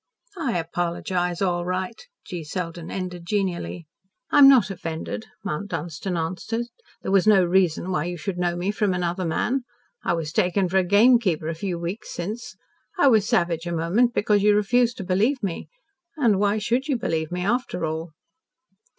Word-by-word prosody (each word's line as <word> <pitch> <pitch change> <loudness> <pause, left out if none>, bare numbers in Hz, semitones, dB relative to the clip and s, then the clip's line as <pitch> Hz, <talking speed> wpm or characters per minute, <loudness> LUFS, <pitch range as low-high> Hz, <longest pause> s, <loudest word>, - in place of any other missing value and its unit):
"I 255 - 0
apologise, 175 +2 -2
all 175 -2 0
right," 185 - -4 0.2
G. 175 -4 -6
Selden 170 +1 -5
ended 180 -2 -5
genially. 180 -3 -2 0.5
"I - - +5
am 275 -1 +10
not 245 -8 +5
offended," 160 - -5 0.2
Mount 175 +7 -3
Dunstan 175 +2 -4
answered. 185 +8 -2 0.4
"There - - -2
was 195 +1 +4
no 195 -4 +6
reason 180 0 +1
why 170 -3 0
you 175 0 -4
should 180 +3 -4
know 175 -1 0
me 180 +3 -1
from 210 -3 0
another 180 +1 -1
man. 245 +11 0 0.4
I - - +1
was 165 -2 -3
taken 185 +1 +2
for 190 - +1
a - - +2
gamekeeper 205 -4 +4
a - - -1
few 175 +2 -3
weeks 170 +5 -5
since. 210 +7 -5 0.4
I 285 -6 +5
was 215 -4 +4
savage 170 -1 +1
a - - -2
moment, 185 +9 +1
because 205 -1 +3
you 210 0 +4
refused 240 +4 +2
to 195 - -5
believe 210 +8 +1
me 185 -4 -3 0.5
and 230 -9 +3
why 205 +1 +2
should 240 +6 0
you 280 -4 +1
believe 160 -8 -2
me 180 0 -2
after 210 -6 -1
all?" 160 +1 -4
185 Hz, 175 wpm, -24 LUFS, 170-210 Hz, 0.5 s, am